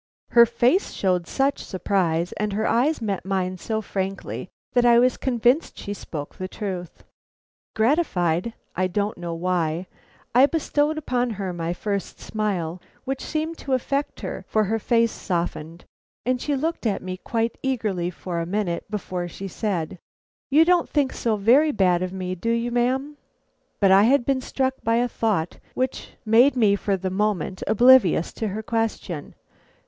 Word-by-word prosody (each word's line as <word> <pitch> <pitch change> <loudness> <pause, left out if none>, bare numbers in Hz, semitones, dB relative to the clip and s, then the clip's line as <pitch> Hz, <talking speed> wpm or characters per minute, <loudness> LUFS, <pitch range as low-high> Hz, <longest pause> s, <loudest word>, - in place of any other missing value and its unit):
Her 235 -1 +7
face 245 - +2
showed 180 -3 0
such 275 +1 0
surprise, 180 -3 0
and 210 -1 -2
her 215 +2 0
eyes 250 +4 +2
met 200 -3 -2
mine 185 -1 -2
so 220 +3 -2
frankly, 195 -1 -4 0.2
that 245 -2 +4
I 240 -1 +6
was 250 +1 +4
convinced 250 +4 +1
she 205 - -5
spoke 150 -7 -7
the 185 - -5
truth. 185 -3 -6 0.7
Gratified 220 - +1 0.2
I 185 +1 +1
don't 205 +1 -2
know 170 -1 -4
why, 170 -1 -1 0.5
I 255 +4 +7
bestowed 305 -1 0
upon 250 -5 0
her 190 -3 -3
my 170 -1 -3
first 200 +2 -4
smile, 185 -6 -2 0.2
which 270 0 -3
seemed 315 +1 -3
to 270 - -3
affect 275 +3 -1
her, - - -5
for 215 - +2
her 220 +2 0
face 230 +1 +2
softened, 170 -2 -4 0.4
and 250 0 0
she 290 - 0
looked 310 -2 -1
at 205 - -1
me 185 0 -5
quite 230 +4 -2
eagerly 215 -10 -1
for 175 -1 -5
a 165 - -2
minute 190 -1 -2
before 185 -4 -3
she 195 +3 -7
said: 185 -4 -3 0.5
"You 305 +4 +6
don't 355 0 +3
think 285 -3 +1
so 230 -2 0
very 250 +10 +4
bad 180 -7 +2
of 185 0 -2
me, 185 -1 -4
do 185 +6 -3
you, 235 +1 0
ma'am?" 260 +5 0 0.6
But 195 -2 +4
I 195 +2 +7
had 255 0 +3
been 270 -1 +1
struck 260 +1 -1
by 230 +1 +2
a 240 +1 +2
thought 210 -9 -1 0.2
which 255 0 -3
made 240 +5 +5
me 215 -5 +4
for 200 -1 -1
the 185 0 -3
moment 190 -2 -1
oblivious 240 -7 +5
to 220 - -3
her 210 +2 -4
question. 220 -9 -3
215 Hz, 165 wpm, -24 LUFS, 185-250 Hz, 0.7 s, Her